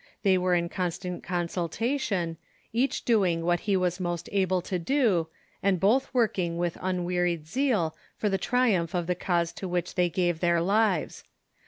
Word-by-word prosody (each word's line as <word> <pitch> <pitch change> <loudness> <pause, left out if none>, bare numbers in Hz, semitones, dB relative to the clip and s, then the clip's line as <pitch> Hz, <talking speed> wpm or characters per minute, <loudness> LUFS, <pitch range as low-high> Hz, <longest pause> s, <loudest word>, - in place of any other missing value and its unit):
They 195 -2 +4
were 180 0 +2
in 170 0 +1
con 180 +1 -1
stant 180 +1 -6
consultation, 175 - -2 0.4
each 250 +3 0
doing 185 -8 +2
what 175 0 +2
he 200 - +4
Avas 180 0 0
most 175 -2 -3
able 190 -2 +2
to 185 -1 -2
do, 205 - +2 0.3
and 195 -2 +2
both 230 +9 +2
working 200 -9 +1
with 175 -1 -1
unwearied 180 -3 -1
zeal 220 - 0 0.2
for 215 - 0
the 195 -1 0
triumph 205 -10 +1
of 175 -1 0
the 180 - +1
cause 170 -1 0
to 190 - -6
which 175 -1 -2
they 180 -1 +2
gave 175 -2 0
their 170 -1 +2
lives. 210 +6 +1
180 Hz, 170 wpm, -27 LUFS, 170-200 Hz, 0.4 s, They